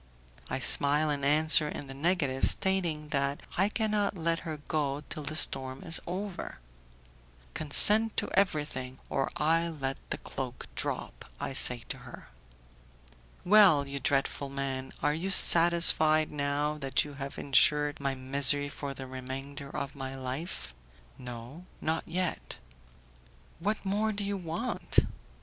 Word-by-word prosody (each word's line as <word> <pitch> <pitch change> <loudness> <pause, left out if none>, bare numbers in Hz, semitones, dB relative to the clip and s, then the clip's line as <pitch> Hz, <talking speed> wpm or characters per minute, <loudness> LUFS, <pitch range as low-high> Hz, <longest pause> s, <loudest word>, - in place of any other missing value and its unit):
I - - -2
smile 150 +2 +4
and 140 -1 -3
answer 155 +2 +5
in 145 - -6
the 135 - -10
negative, 140 -3 0
stating 170 -6 -1
that 140 0 -2
I 195 +3 +2
cannot 210 -3 -1
let 165 0 -1
her 160 -2 -6
go 145 -2 -2
till 155 - -5
the 150 +2 -5
storm 130 -3 0
is 165 - +1
over. 190 +1 -6 1.0
"Consent 210 +9 +3
to - - +1
everything, 145 -9 -1
or 135 - -1
I 165 +2 +1
let 135 -4 -4
the - - -3
cloak 130 -2 -7
drop," - - -4
I - - -4
say 125 -2 +2
to - - -5
her. - - -13 1.2
"Well, 180 -8 +5
you 140 0 -5
dreadful 140 0 -1
man, 135 -1 -5
are 150 - +2
you 170 +5 -4
satisfied, 165 -4 +7
now 145 +1 -2
that 135 0 0
you 145 - -10
have 135 0 -6
insured 145 +1 +2
my 140 -1 -2
misery 140 +2 +3
for 140 -1 -7
the 135 - -8
remainder 135 +2 -8
of 140 0 -5
my 135 -1 -7
life?" 130 - -6 0.5
"No, 125 +8 -10
not 160 +1 -2
yet." 180 +1 -4 1.0
"What 205 +4 -3
more 210 +3 0
do 205 -1 -4
you 200 0 -3
want?" 185 +8 -4
150 Hz, 140 wpm, -29 LUFS, 135-170 Hz, 1.2 s, satisfied